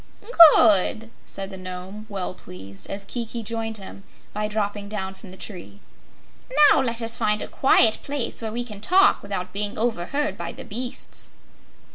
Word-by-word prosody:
"Good!" 220 +1 +4 0.2
said 195 0 -6
the 190 - -8
Nome, 185 +3 -8
well 195 -3 -4
pleased, 95 - -9
as 195 0 -5
Kiki 235 +1 -4
joined 225 0 -3
him 195 0 -11 0.3
by 210 0 -2
dropping 205 -1 -3
down 190 -2 -4
from 190 - -14
the 185 - -11
tree. 195 0 -9 0.9
"Now - - +4
let 235 -2 -2
us 230 0 +1
find 210 0 +1
a - - -6
quiet 230 -4 +4
place 280 -5 -3
where 220 -1 -4
we 240 +2 -3
can 210 -4 -10
talk 380 - +4
without 185 -2 -5
being 205 +1 -2
overheard 240 - -2
by 170 -1 -6
the - - -10
beasts." 245 +4 -4
210 Hz, 165 wpm, -23 LUFS, 190-230 Hz, 0.9 s, Good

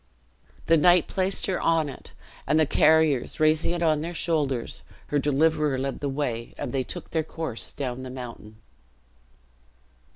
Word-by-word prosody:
The 165 - +4
knight 175 +1 +5
placed 190 +1 0
her 190 -2 -1
on 165 -2 +2
it; 135 - -11 0.3
and 150 +3 +3
the 155 - +4
carriers 155 -3 +3
raising 155 0 +3
it 170 -1 -2
on 155 -2 +3
their 170 +3 -5
shoulders, 145 -8 -1 0.3
her 145 - +1
deliverer 150 0 +1
led 135 +1 -3
the 145 - -2
way, 125 -5 -3
and - - -4
they 135 -1 -1
took 175 +5 -7
their 160 - +1
course 160 -6 -4
down 130 -2 -4
the 130 - -7
mountain. 120 -4 -9
150 Hz, 160 wpm, -25 LUFS, 135-160 Hz, 0.3 s, knight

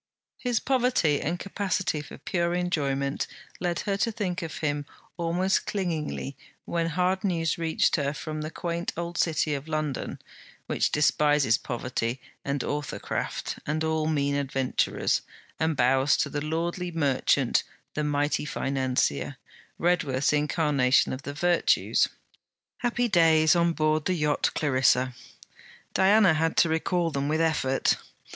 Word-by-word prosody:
His 245 -3 0
poverty 250 - +2
and 170 +4 -1
capacity 190 -4 -2
for 145 - -11
pure 170 -1 -1
enjoyment 140 -6 -1 0.3
led 175 -2 -1
her 200 -1 -1
to 230 +3 +1
think 195 -5 -3
of 165 -2 -5
him 145 -1 -2 0.3
almost 175 +3 0
clingingly 160 -7 -3 0.3
when 170 -1 -1
hard 180 +3 0
news 170 -5 0
reached 165 0 +2
her 140 -2 0
from 155 +1 -5
the 155 - -4
quaint 170 +1 -3
old 170 0 -4
City 155 -2 +1
of 140 +2 -4
London, 155 -3 -3 0.5
which - - 0
despises 145 -4 +3
poverty 120 -1 -3 0.2
and 140 0 -1
authorcraft 145 -1 -3
and 155 +1 0
all 160 -1 0
mean 140 -2 +1
adventurers, 135 -2 0 0.4
and 160 -2 0
bows 130 +2 +3
to - - -1
the 145 - -2
lordly 170 +3 -2
merchant, 145 -6 +2 0.3
the 150 - -1
mighty 145 0 0
financier, 130 - -1 0.4
Redworth's 155 -7 +1
incarnation 145 -4 +2
of 130 - -5
the 140 - -6
virtues. 175 +2 +2 0.7
Happy 240 0 0
days 160 -4 +5
on 170 0 +3
board 155 -1 +1
the 185 - +1
yacht 150 -3 +1
Clarissa! 130 -3 +2 0.8
Diana 195 -1 +5
had 160 +1 0
to 170 - +5
recall 165 +1 0
them 140 -1 -1
with 155 +2 +1
effort. 150 -5 +2
155 Hz, 135 wpm, -27 LUFS, 145-175 Hz, 0.8 s, days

